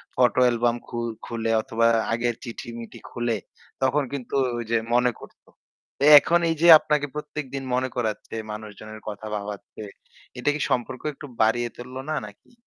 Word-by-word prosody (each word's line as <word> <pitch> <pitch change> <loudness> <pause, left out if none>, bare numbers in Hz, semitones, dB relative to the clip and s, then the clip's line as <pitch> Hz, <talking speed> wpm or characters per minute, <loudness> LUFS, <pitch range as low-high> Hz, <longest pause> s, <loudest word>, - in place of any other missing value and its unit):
Photo 125 0 +3
album 120 0 +2
খু 120 - -6 0.3
খুলে 115 -1 -2
অথবা 115 +1 +1 0.3
আগের 120 0 0
চিঠি-মিঠি 115 -1 -8
খুলে, 120 -2 -1 0.5
তখন 140 +2 +2
কিন্তু 135 -1 -4 0.2
ওই 120 - -3
যে 115 - +4 0.2
মনে 125 0 +4
করত। - - -14 0.6
এ - - +6
এখন 170 +4 +2
এই 165 - +1
যে 170 - +5
আপনাকে 150 -1 0
প্রত্যেকদিন 140 -3 -5
মনে 130 0 0
করাচ্ছে 110 -2 -3 0.2
মানুষজনের 110 0 -9
কথা 105 +1 -7
ভাবাচ্ছে। 105 +1 -7 0.6
এটা 145 - +1
কি 150 - -4
সম্পর্ক 125 0 -1
একটু 145 - -10 0.2
বাড়িয়ে 120 +2 +2
তুলল 125 +1 -9
না 155 - 0
নাকি? 105 - -18
120 Hz, 155 wpm, -25 LUFS, 115-130 Hz, 0.6 s, এ